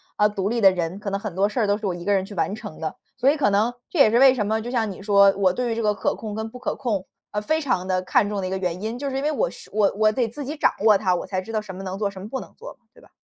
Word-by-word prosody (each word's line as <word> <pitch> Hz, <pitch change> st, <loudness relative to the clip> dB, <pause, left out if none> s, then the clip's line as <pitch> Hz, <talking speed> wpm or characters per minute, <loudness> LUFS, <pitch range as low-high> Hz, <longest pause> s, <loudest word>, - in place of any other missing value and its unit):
呃， 210 Hz, 0 st, +3 dB
独 200 Hz, -2 st, -2 dB
立 230 Hz, +2 st, 0 dB
的 195 Hz, -2 st, +7 dB
人， 175 Hz, 0 st, -3 dB
可 205 Hz, -, -4 dB
能 200 Hz, 0 st, -2 dB
很 200 Hz, -4 st, -6 dB
多 195 Hz, +2 st, +3 dB
事 230 Hz, -, -3 dB
儿 215 Hz, -, +2 dB
都 205 Hz, 0 st, +2 dB
是 215 Hz, -, -7 dB
我 185 Hz, -, 0 dB
一 175 Hz, 0 st, -8 dB
个 205 Hz, -, +2 dB
人 195 Hz, -1 st, +2 dB
去 195 Hz, -, -9 dB
完 195 Hz, +3 st, -1 dB
成 160 Hz, -, -9 dB
的， 160 Hz, -, -4 dB, 0.2 s
所 255 Hz, +2 st, +3 dB
以 290 Hz, -, +3 dB
可 285 Hz, -9 st, +2 dB
能， 210 Hz, +4 st, +2 dB, 0.2 s
这 345 Hz, -, -3 dB
也 250 Hz, -, +7 dB
是 230 Hz, -, +3 dB
为 265 Hz, +1 st, +7 dB
什 225 Hz, -5 st, -1 dB
么， 220 Hz, +1 st, 0 dB
就 240 Hz, +2 st, -6 dB
像 230 Hz, -4 st, 0 dB
你 195 Hz, -, -8 dB
说， 200 Hz, -1 st, +5 dB
我 190 Hz, -2 st, +3 dB
对 245 Hz, +6 st, -2 dB
于 -, -, -1 dB
这 230 Hz, -, -2 dB
个 210 Hz, -1 st, +2 dB
可 -, -, -1 dB
控 215 Hz, -2 st, -6 dB
跟 220 Hz, +1 st, -4 dB
不 250 Hz, -, -10 dB
可 250 Hz, -, -2 dB
控， 210 Hz, -8 st, -2 dB, 0.3 s
呃， 210 Hz, -, -2 dB
非 315 Hz, +9 st, 0 dB
常 245 Hz, -, -1 dB
地 185 Hz, -1 st, 0 dB
看 200 Hz, +2 st, +2 dB
重 205 Hz, -1 st, -2 dB
的 185 Hz, -, -2 dB
一 -, -, -4 dB
个 190 Hz, -, -2 dB
原 180 Hz, -1 st, -3 dB
因， 225 Hz, +2 st, -3 dB
就 280 Hz, +2 st, -3 dB
是 265 Hz, -, -3 dB
因 270 Hz, -, -2 dB
为 300 Hz, -, +2 dB
我 -, -, 0 dB
是 -, -, -13 dB
我 210 Hz, -2 st, +3 dB
我 215 Hz, 0 st, +4 dB
得 235 Hz, +1 st, 0 dB
自 285 Hz, +5 st, -7 dB
己 295 Hz, +4 st, -4 dB
掌 310 Hz, -, +3 dB
握 215 Hz, -2 st, +7 dB
它， 190 Hz, -2 st, +1 dB
我 -, -, -4 dB
才 185 Hz, -2 st, -2 dB
知 190 Hz, -, -9 dB
道 220 Hz, -, 0 dB
什 195 Hz, -3 st, -9 dB
么 190 Hz, -, -7 dB
能 190 Hz, 0 st, -4 dB
做 205 Hz, -2 st, 0 dB
什 195 Hz, -1 st, -10 dB
么 200 Hz, -, -7 dB
不 265 Hz, -, -3 dB
能 -, -, -11 dB
做， -, -, -11 dB, 0.2 s
对 -, -, -19 dB
吧？ -, -, -20 dB
210 Hz, 390 characters per minute, -23 LUFS, 195-240 Hz, 0.3 s, 的